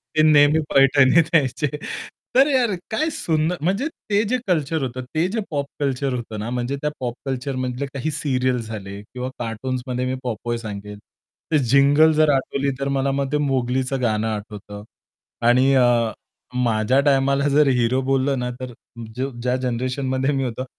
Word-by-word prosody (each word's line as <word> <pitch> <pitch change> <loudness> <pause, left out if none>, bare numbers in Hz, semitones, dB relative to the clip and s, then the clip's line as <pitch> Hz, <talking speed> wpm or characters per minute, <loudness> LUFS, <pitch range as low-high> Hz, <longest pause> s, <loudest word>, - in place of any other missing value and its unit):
ते 155 - +4
नेहमी 150 0 +5
पैठणीत 140 +3 +5
यायचे 145 0 +2 0.7
तर 270 +2 +6
यार 245 -6 +2 0.2
काय 310 +9 0
सुंदर 160 +2 0
म्हणजे 195 - 0 0.2
ते 205 +2 +3
जे 255 - +3
कल्चर 160 -3 0
होतं 130 0 -4
ते 165 +3 +2
जे 225 - 0
पॉप 145 -2 -2
कल्चर 135 -1 -1
होतं 115 -3 -5
ना 110 +3 -4
म्हणजे 125 +3 -2
त्या 150 - +1
पॉप 125 -2 -2
कल्चरमधले 130 0 -3
काही 140 +3 -4
सीरियल्स 130 -5 0
झाले 100 -2 -7
किंवा 125 +4 -6
कार्टून्समध्ये 125 +2 -3
मी 130 0 -1
पॉपय 120 0 -3
सांगेल. 105 -2 -7 0.5
ते 155 - +4
जिंगल 145 +3 +6
जर 155 0 +3
आठवली 140 +1 -1
तर 140 - -1
मला 135 0 +1
मग 135 0 -2
ते 150 - +2
मोगलीचं 130 0 0
गाणं 110 -2 0
आठवतं. 105 -1 -6 0.6
आणि 130 +3 +5
अ, 120 -3 +3 0.5
माझ्या 115 +3 +2
टायमाला 140 0 +3
जर 150 -1 +5
हिरो 125 +3 +2
बोललं 135 0 +1
ना, 125 0 -2
तर 125 -2 -6 0.7
ज्या 125 0 +1
जनरेशनमध्ये 130 +2 -1
मी 135 -1 0
होतो 130 +1 -4
130 Hz, 160 wpm, -22 LUFS, 120-145 Hz, 0.7 s, तर